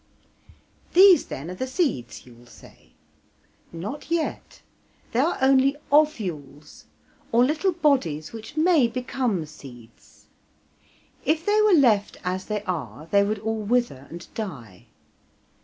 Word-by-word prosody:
"These, 370 0 +7
then, 150 +6 -7
are 220 +8 -4
seeds," 130 - -2
you 125 - -15
will 120 +1 -19
say. - - -18 0.8
Not 205 - -7
yet; 335 -1 -3 0.5
they 235 - 0
are 315 +7 +1
only 270 +1 +4
ovules, 185 - -1 0.5
or 235 +2 +4
little 310 +7 0
bodies 255 - 0
which 225 +6 -10
may 315 -5 +4
become 235 -6 -2
seeds. 120 -6 -15 1.0
If 315 +2 0
they 420 +1 +3
were 425 -3 +5
left 220 -8 +2
as 185 +1 -3
they 210 -1 -3
are 165 -5 -5
they 200 0 +5
would 210 +2 -1
all 220 +1 -3
wither 215 - -1
and 175 +1 -9
die. 125 - -8
220 Hz, 125 wpm, -24 LUFS, -, 1.0 s, These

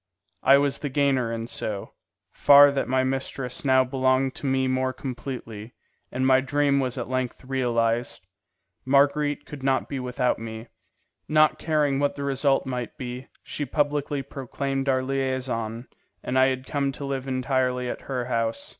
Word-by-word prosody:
I 135 +1 +6
was 140 -1 0
the 145 - -3
gainer 135 -4 +1
in 115 0 -3
so 105 -4 -5 0.4
far 145 0 +7
that 140 -1 -1
my 130 0 +2
mistress 130 -1 -3
now 130 -2 +4
belonged 130 0 +1
to 140 - -5
me 130 0 +1
more 130 0 0
completely, 120 -4 -7 0.4
and 130 +1 -1
my 130 0 +5
dream 140 +1 +1
was 130 -1 -2
at 120 - -3
length 130 0 -3
realized. 120 -6 -1 0.6
Marguerite 145 +2 +2
could 145 -2 -9
not 135 0 +1
be 140 - -4
without 125 -1 -1
me. 110 +1 -7 0.6
Not 155 0 +3
caring 150 -4 +1
what 145 0 0
the 140 - -5
result 135 0 +1
might 125 -3 -4
be, 125 0 -6 0.2
she 150 - -4
publicly 145 0 -1
proclaimed 135 +1 -3
our 130 -1 +2
liaison, 130 -3 -2 0.4
and 130 +1 0
I 130 - +6
had 130 0 -2
come 140 0 -1
to 140 - -6
live 135 -1 -3
entirely 130 -1 0
at - - -5
her 125 -2 -2
house. 115 -2 -2
130 Hz, 165 wpm, -25 LUFS, 125-140 Hz, 0.6 s, far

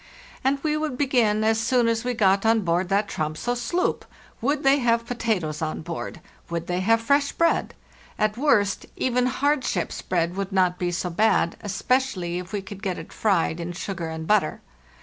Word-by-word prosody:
And 270 +2 +2
we 305 -1 +1
would 305 -4 -2
begin 235 -6 +2
as 220 0 +2
soon 235 +1 +2
as 230 0 0
we 250 0 -1
got 195 -2 +3
on 225 0 +3
board 175 0 0
that 200 +1 +2
Tromso 155 +6 -2
sloop. 245 +10 -1 0.4
Would 285 +4 0
they 275 +1 +5
have 230 -2 +2
pota 230 -4 0
toes 155 -2 -5
on 155 0 -3
board? 170 0 -6 0.3
Would 170 0 -3
they 180 +1 -1
have 225 +5 +3
fresh 280 +4 +2
bread? 335 0 +1 0.4
At 215 -1 +1
worst, 220 -7 +2
even 250 0 +1
hard 285 +2 +1
ship's - - -2
bread 175 -1 -1
would 195 0 -3
not 185 -2 +2
be 180 - 0
so_ 175 0 -3
bad, 210 -5 +3
especially 195 -3 -1
if 180 - -9
we 205 -2 -3
could 195 0 -9
get 185 -3 -2
it 165 - -9
fried 175 -5 +1
in 170 +1 -4
sugar 175 -2 -4
and_ 160 0 -5
butter. 195 -3 +1
210 Hz, 190 wpm, -24 LUFS, 180-245 Hz, 0.4 s, they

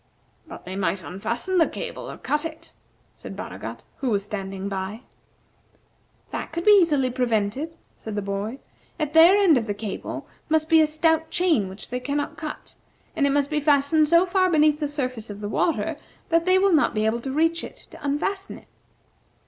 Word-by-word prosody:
"But - - -11
they 185 +1 -6
might 195 -1 -1
unfasten 235 - -2
the 325 - +5
cable, - - -6
or - - -8
cut 295 +1 -1
it," 325 -1 -8 0.4
said - - -9
Baragat, - - -7
who 265 - -2
was 200 -3 +1
standing 195 -1 -5
by. 195 +3 -4 1.3
"That - - -5
could 340 +4 -4
easily 330 -11 +5
be - - -7
prevented," 250 +5 -1 0.2
said 220 -2 -8
the 205 - -2
boy. 200 +5 -3 0.4
"At 300 -2 -2
their 330 +4 +8
end 355 -10 +5
of 225 - -6
the 205 - -2
cable 205 -1 -6 0.2
must 315 0 +2
be 325 -1 +6
a 310 - +4
stout 320 +1 +1
chain 320 - +2
which 190 +2 -10
they 250 - -2
cannot 285 +3 -2
cut, 305 -2 -7 0.4
and 285 -3 +2
it - - +1
must 285 +1 +1
be 305 - +1
fastened 295 +1 +3
so 340 +2 +5
far 370 0 +2
beneath 305 -2 +3
the 295 - -1
surface 255 -6 -4
of 205 0 -7
the 205 - -4
water 330 +8 0 0.3
that 330 0 +2
they 370 0 +5
will 390 -1 +3
not 300 -6 +3
be 215 0 +1
able 220 +2 +1
to 265 +3 -5
reach 330 +3 +1
it - - -8 0.2
to - - -13
unfasten 385 +8 -2
it." - - -18
290 Hz, 195 wpm, -24 LUFS, 220-325 Hz, 1.3 s, their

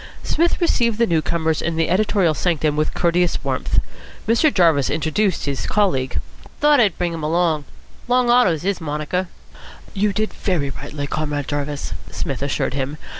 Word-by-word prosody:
Psmith 340 +2 +1
received 235 - +1
the 235 - +3
new 165 -6 +1
corners 160 -1 0
in 170 0 -2
the 165 0 +1
editorial 190 -2 +2
sanctum 155 -2 0
with 155 +1 -1
courteous 175 0 +2
warmth. - - -2 0.5
Mr. 235 +7 +4
Jarvis 165 - +3
introduced 160 +6 0
his 140 -2 -2
colleague. 135 - +1 0.4
"Thought 295 -1 +5
I'd 215 -5 +3
bring 175 -1 -1
him 165 - -5
along. 160 -1 +1 0.4
Long 250 0 +3
Otto's 220 -11 +3
his 200 +1 0
monaker." 160 +4 -2 0.7
"You 205 +1 +1
did 215 +2 -2
very 155 -8 -1
rightly, 145 +1 -6
Comrade 145 -1 -3
Jarvis," 145 0 -3 0.2
Psmith 135 -2 -4
assured 140 -2 -1
him. 140 +2 -3
170 Hz, 160 wpm, -21 LUFS, 150-205 Hz, 0.7 s, Thought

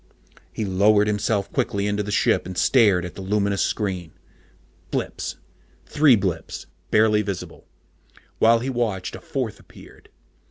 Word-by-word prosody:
_ - - -22
He 110 - -3
lowered 100 +2 +3
himself 105 -1 -1
quickly 100 0 -1
into 105 0 0
the 105 - -5
ship 100 - +2
and 90 -1 -7
stared 100 -9 +4
at 90 - -7
the - - -9
luminous 100 0 0
screen. 90 -6 -2 0.8
Blips - - -3 0.5
three 145 -4 +5
blips 95 -4 -3 0.2
barely 105 0 +4
visible. 100 -3 -6 0.7
While 115 +1 +5
he 130 - -3
watched, 110 -7 -2
a - - -10
fourth 125 -6 -4
appeared. - - -17
105 Hz, 145 wpm, -23 LUFS, 95-110 Hz, 0.8 s, three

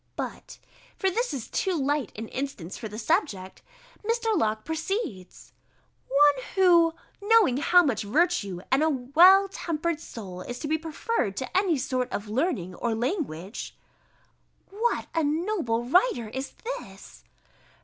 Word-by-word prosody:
But - - -6 0.4
(for 385 -1 +1
this 475 +3 -1
is 265 -6 -5
too 380 -2 -1
light 285 -3 0
an 225 +1 -5
instance 260 -10 -5
for 225 - -6
the 210 0 -8
subject) 215 - -1 0.4
Mr. 455 0 0
Locke 215 - 0
proceeds 320 - -4 0.5
"One 280 -1 +4
who 340 -4 +5 0.3
knowing 415 - +4
how 355 +5 +5
much 255 -9 0
virtue 210 - 0
and 265 - +4
a 315 - +3
well 330 +9 +6
tempered 335 -4 -3
soul 190 - -8
is 245 +6 -6
to 295 - -5
be 315 +1 0
preferred 320 - -2
to 260 - -5
any 370 -5 +3
sort 255 -1 -2
of 205 - -4
learning 225 - -1
or 230 +4 -2
language," 225 - -4 1.0
[_What 460 +4 0
a 325 - +1
noble 305 - 0
writer 265 - +2
is 265 +4 -6
this! - - -8
295 Hz, 140 wpm, -26 LUFS, 225-360 Hz, 1.0 s, well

